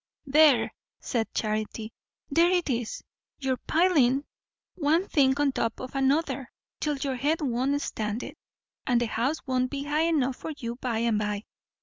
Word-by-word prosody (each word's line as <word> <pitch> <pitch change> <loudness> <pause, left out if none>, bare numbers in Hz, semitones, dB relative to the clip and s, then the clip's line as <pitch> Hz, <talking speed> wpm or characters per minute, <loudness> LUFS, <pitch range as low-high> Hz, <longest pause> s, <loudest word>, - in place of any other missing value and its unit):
"There!" 285 -3 +5 0.3
said 225 -3 -2
Charity. 215 +1 -3 0.4
"There 335 +4 +5
it 355 -5 +1
is! 235 -2 -3 0.3
You're 265 -2 -1
pilin' 295 -6 +3 0.5
one 330 +4 +1
thing 270 -1 +3
on 290 -1 +3
top 230 -3 -2
of 255 - -7
another, 270 -1 0 0.3
till 295 -2 -1
your 270 -1 -2
head 300 +5 +1
won't 270 +1 +1
stand 215 +2 -3
it; - - -8 0.5
and 245 -2 +3
the 240 - +1
house 250 +8 -1
won't 255 -1 0
be 280 0 -4
high 300 +3 +1
enough 270 -6 +1
for 320 - -5
you 235 -3 -5
by 245 -3 -2
and 225 -3 +2
by. 210 0 -2
265 Hz, 160 wpm, -27 LUFS, 235-295 Hz, 0.5 s, There